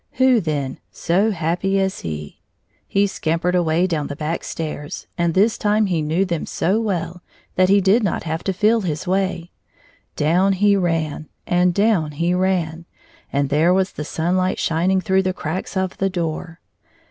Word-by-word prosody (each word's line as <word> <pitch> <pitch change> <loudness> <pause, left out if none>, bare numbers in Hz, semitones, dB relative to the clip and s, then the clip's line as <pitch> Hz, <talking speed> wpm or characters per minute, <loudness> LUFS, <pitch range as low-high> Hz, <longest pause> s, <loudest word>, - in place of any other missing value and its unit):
Who 260 -1 +4
then 145 -6 -3
so 195 +6 +1
happy 180 +1 0
as 190 0 -1
he? 75 -2 -7 0.5
He 200 +1 +2
scamp 170 -3 -2
ered 180 0 +1
away 175 0 +2
down 160 -5 -1
the 145 - -5
back 155 +3 -3
stairs, 150 -2 -5
and 170 -2 0
this 210 +4 +3
time 210 +1 +2
he 175 -5 0
9+ - - -3
knew 165 +6 +1
them 170 -4 -3
so 195 +6 0
well 175 -5 -3 0.3
that 185 0 +3
he 200 0 +5
did 195 +5 +4
not 200 -5 -1
have 160 0 -3
to 195 - +1
feel 215 +4 +2
his 175 -1 -3
way, 185 -2 -1 0.6
Down 180 +6 +2
he 200 +2 +3
ran 165 -5 -1 0.2
and 180 0 +3
down 185 -6 +1
he 170 +4 0
ran, 175 -3 -1 0.4
and 140 0 0
there 160 +5 +3
was 190 0 +1
the 150 - -6
sunlight 185 +4 0
shining 180 +4 +1
through 190 +2 +2
the 185 -1 -1
cracks 185 +3 -4
of 190 -1 -1
the 195 - +1
door. 170 -1 -4
180 Hz, 180 wpm, -21 LUFS, 160-190 Hz, 0.6 s, he